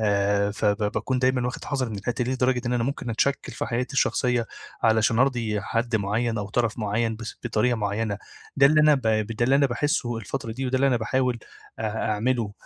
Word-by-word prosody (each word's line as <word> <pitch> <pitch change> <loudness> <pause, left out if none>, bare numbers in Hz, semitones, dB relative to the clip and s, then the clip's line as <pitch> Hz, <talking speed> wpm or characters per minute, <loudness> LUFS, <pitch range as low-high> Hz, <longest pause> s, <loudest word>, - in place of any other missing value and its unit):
آآ 100 -1 +2
فب 105 0 +1 0.2
باكون 130 -1 -1
دايمَّا 130 -1 +1
واخِد 125 - -5
حَذَري 135 -5 -2
مِن 105 - -5
الحتّه 120 +5 -2
دي، 125 - -1
لدرجة 125 -1 +1
إن 120 - 0
أنا 120 -1 +1
ممكن 135 -3 -3
أتشَكِّل 140 +5 0
في - - -4
حياتي 125 +4 -2
الشخصية 125 -3 +1 0.4
علشان 110 0 +3
أرضي 120 -5 +1
حد 115 +1 -1
مُعيّن 110 +3 -1
أو 100 -1 -4
طَرَف 115 0 0
مُعيّن 110 +1 -1
بس 110 -1 -7
بطريقة 120 +1 +1
مُعيّنة. 105 0 -2 0.4
ده 140 - +7
اللي 155 +2 +4
أنا 150 0 +6
ب 135 - -2
ب 110 -1 +1
ده 120 - +2
اللي 135 +3 +4
أنا 140 - +4
باحسُّه 120 -2 -1
الفترة 115 +1 -5
دي، 130 +3 -3
وده 130 +1 0
اللي 135 +1 +3
أنا 130 -3 +3
باحاوِل 125 +2 0 0.4
آآ 110 0 -2
أعمله، 115 0 0
120 Hz, 210 wpm, -25 LUFS, 110-130 Hz, 0.4 s, ده